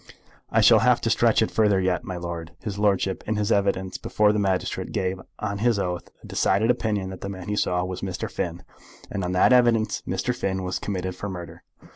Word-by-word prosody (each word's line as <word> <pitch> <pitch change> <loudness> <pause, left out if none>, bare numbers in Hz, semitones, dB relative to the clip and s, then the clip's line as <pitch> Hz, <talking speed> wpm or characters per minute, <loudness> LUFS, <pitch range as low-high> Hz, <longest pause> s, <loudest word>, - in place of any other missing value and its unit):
"I - - +3
shall - - +7
have - - +4
to - - +1
stretch - - +4
it - - -2
further 105 -3 +3
yet, 95 +3 0
my 95 -7 -5
lord. 85 -1 -6
His 100 -2 -4
lordship 95 -2 +1
in 110 - 0
his 105 +1 0
evidence 100 -2 0
before 105 0 +2
the 105 - 0
magistrate 95 -2 -1
gave 95 0 -1 0.2
on 100 -1 -3
his 115 0 +2
oath 90 -4 -3
a - - -11
decided 110 +4 +2
opinion 105 -6 -1
that 95 - -9
the 100 - -4
man 95 -1 -7
he 105 - 0
saw 90 -3 0
was 90 -1 -5
Mr. 95 -2 -3
Finn; 85 0 -4 0.5
and 100 -2 -2
on 90 +1 -2
that 95 +7 +5
evidence 120 -3 +3
Mr. 95 +7 -1
Finn 95 -3 -2
was 90 0 -2
committed 95 -2 -3
for 100 +2 -5
murder. 85 -3 -8
95 Hz, 215 wpm, -25 LUFS, 90-105 Hz, 0.5 s, shall